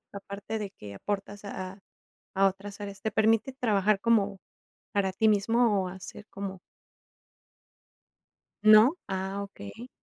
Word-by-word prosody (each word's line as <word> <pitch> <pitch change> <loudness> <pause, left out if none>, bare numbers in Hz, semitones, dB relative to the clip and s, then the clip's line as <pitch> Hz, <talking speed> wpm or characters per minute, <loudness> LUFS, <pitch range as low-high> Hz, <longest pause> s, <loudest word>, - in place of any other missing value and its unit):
a 200 - -6
parte 200 +3 -5
de 205 -2 -4
que 105 - -10
aportas 205 - -4
a 200 - -6 0.2
a 195 0 -18 0.5
a 195 0 +6
otras 200 +2 -8
áreas. 200 -1 -7
¿Te 220 +1 -2
permite 225 +4 +3
trabajar 215 -6 +2
como 205 -4 +2 0.5
para 195 -2 +1
ti 220 +4 +3
mismo, 215 -1 +3
o, - - -3
hacer 190 +3 -9
como 195 -2 -6 2.0
¿No? 215 +6 +8
Ah, 190 +1 -2
okey. 200 - -9
200 Hz, 140 wpm, -29 LUFS, 195-215 Hz, 2.0 s, No